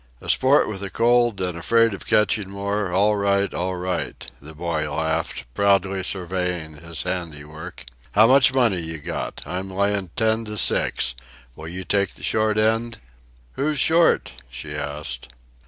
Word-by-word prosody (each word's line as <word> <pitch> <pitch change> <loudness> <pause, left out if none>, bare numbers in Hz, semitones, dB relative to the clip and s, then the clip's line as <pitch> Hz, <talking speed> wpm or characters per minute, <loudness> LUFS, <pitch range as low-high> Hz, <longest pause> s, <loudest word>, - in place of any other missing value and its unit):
"A - - -9
sport 135 +3 +4
with 100 -2 -5
a 100 - -4
cold 120 0 +2
and 90 -2 -2
afraid 115 +6 +3
of 100 - -8
catching 105 -2 +2
more, 100 0 -2
all 105 +3 +3
right 100 0 +1
all 90 +1 -2
right," 90 -1 -4
the 75 +2 -11
boy 80 -2 -2
laughed, 80 -2 -2
proudly 100 -1 +2
surveying 90 -4 -2
his 85 +1 -5
handiwork. 80 -2 -5 0.3
"How 110 +2 +7
much 130 +2 +6
money 120 -8 +2
you 80 -1 -5
got? 80 +3 -5
I'm 95 +2 -4
layin' 100 0 0
ten 110 -1 +2
to 105 0 -6
six. 65 -8 +2 0.4
Will 80 - -9
you 90 +3 -5
take 100 +1 0
the - - -13
short 110 -1 +1
end?" 115 +2 +1 0.6
"Who's 150 +2 -1
short?" 165 +4 +3 0.2
she 65 +5 -7
asked. 75 -3 -4
95 Hz, 155 wpm, -23 LUFS, 85-110 Hz, 0.6 s, How